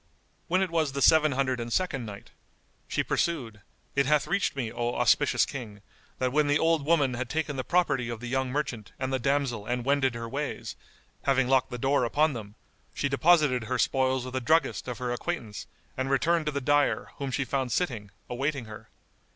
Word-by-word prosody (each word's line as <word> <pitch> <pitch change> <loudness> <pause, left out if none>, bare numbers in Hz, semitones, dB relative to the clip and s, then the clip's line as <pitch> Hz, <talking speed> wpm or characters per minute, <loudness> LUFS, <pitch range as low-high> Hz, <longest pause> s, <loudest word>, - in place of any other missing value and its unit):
When 185 +2 +2
it 185 - -3
was 160 -4 0
the 140 - -2
Seven 155 -2 +5
Hundred 130 -1 0
and 120 0 -5
Second 135 -7 -1
Night, 100 -1 -10 0.6
She - - 0
pursued, 120 -11 -1 0.3
It 140 -1 +2
hath 150 -1 +3
reached 195 -3 0
me, 120 -5 -3
O 120 0 -2
auspicious 120 +4 +3
King, 110 -7 -8 0.4
that 130 -1 0
when 150 +2 +2
the 145 0 +3
old 160 -1 +2
woman 145 -6 +3
had 125 0 -4
taken 155 -1 -2
the 130 - -2
property 145 -9 +1
of 115 -2 -5
the 125 - -8
young 130 +1 -1
merchant 125 -6 -3
and 130 0 -3
the 130 - +1
damsel 130 -5 0
and 125 0 -2
wended 135 -3 +2
her 115 0 -5
ways, 140 +5 -4 0.5
having 135 -2 +3
locked 130 0 +3
the 125 - -5
door 135 +2 +2
upon 150 +5 +2
them, 105 -3 -8 0.4
she 140 - 0
deposited 140 -3 +3
her 125 +2 -1
spoils 130 0 +1
with 130 0 -7
a 130 - 0
druggist 160 +4 +1
of 125 - -4
her 125 -1 -3
acquaintance 120 -5 -4 0.3
and 130 +1 -2
returned 155 +4 +2
to - - +1
the 140 -1 -2
dyer, 145 +2 +1
whom 140 -2 -3
she 130 +1 -1
found 130 -1 -1
sitting, 120 - -1 0.2
awaiting 135 +1 -2
her. 110 -1 -11
135 Hz, 200 wpm, -28 LUFS, 120-145 Hz, 0.6 s, Seven